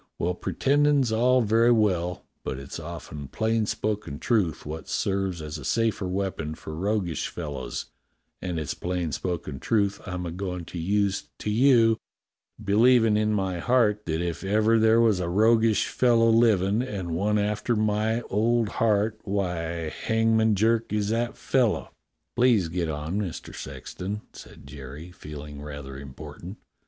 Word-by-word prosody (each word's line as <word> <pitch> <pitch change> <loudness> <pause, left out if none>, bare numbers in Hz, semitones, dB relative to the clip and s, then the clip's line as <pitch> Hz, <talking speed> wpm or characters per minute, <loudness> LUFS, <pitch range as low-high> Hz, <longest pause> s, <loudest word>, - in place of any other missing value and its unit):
Well, 90 +2 0
pretendin' 140 +3 +2
all's 125 0 +3
very 115 +2 +4
well, 90 -6 +1 0.2
but - - -3
it's 70 +1 -7
often 70 -2 -7
plain 110 +5 0
spoken 105 -11 -2
truth 100 -6 0
wot 80 +2 -6
serves 95 -4 -1
as 75 +1 -6
a - - -9
safer 110 - 0
weapon 90 -5 -3
for 80 -1 -8
roguish 95 -1 -1
fellows, 75 -6 -5 0.6
and 90 -3 -3
it's 75 - -3
plain 90 -2 -3
spoken 80 -3 -3
truth 100 - 0
I'm 90 -1 -4
a 85 - -4
goin' 90 -1 -4
to 85 - -7
use 100 +3 0
to 105 - -3
you, 115 -1 +5 0.6
believin' 110 +2 +4
in 105 0 +2
my 95 -4 -1
heart 105 -1 +2
that 80 +1 -1
if 85 0 -3
ever 110 +3 +3
there 110 +1 +5
was 110 -5 +4
a 85 -1 -2
roguish 110 +3 +3
fellow 115 -2 +3
livin', 110 -2 +3
and 100 -9 -4
one 100 +6 +1
after 105 +3 0
my 110 +2 +1
old 115 +1 +1
heart, 110 -1 +1
why, 85 -5 -2
Hangman 110 +4 +2
Jerk 115 +3 +1
is 105 -1 0
that 115 +2 -1
fellow." 125 -5 +1 0.4
"Please 120 -8 +3
get 85 -1 -2
on, 80 +7 -2
JVIister 95 -5 -6
Sexton," 90 +10 -6
said - - -13
Jerry, 70 +4 -9
feeling 75 -3 -9
rather 70 -2 -7
important. 75 +7 -9
100 Hz, 150 wpm, -26 LUFS, 85-110 Hz, 0.6 s, you